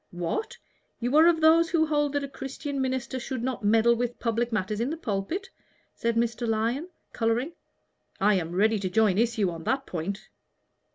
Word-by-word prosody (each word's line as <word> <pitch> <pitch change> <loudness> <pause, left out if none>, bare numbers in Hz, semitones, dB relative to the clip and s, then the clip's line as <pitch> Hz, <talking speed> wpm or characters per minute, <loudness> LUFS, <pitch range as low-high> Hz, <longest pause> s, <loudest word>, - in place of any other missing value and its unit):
"What! 175 - -3 0.4
you 245 +4 -1
are 320 +2 +7
of 330 -2 +3
those 330 +1 +5
who 320 -1 +3
hold 295 -2 0
that 285 -1 0
a - - -3
Christian 275 +1 -5
minister 260 0 -2
should 255 -1 -4
not 255 -3 -3
meddle 225 +3 +4
with 240 +1 -2
public 235 0 -1
matters 210 -1 -1
in 240 +3 0
the 320 - -3
pulpit?" 320 - -3 0.4
said 230 0 -1
Mr. 235 +1 0
Lyon, 230 +9 -1 0.2
coloring. 235 +6 0 0.7
"I 210 +2 +4
am 175 -3 -1
ready 215 +3 +3
to 190 -1 -2
join 205 0 +3
issue 225 -5 +1
on 165 -1 -8
that 270 0 0
point." 185 +4 -5
235 Hz, 180 wpm, -27 LUFS, 215-280 Hz, 0.7 s, are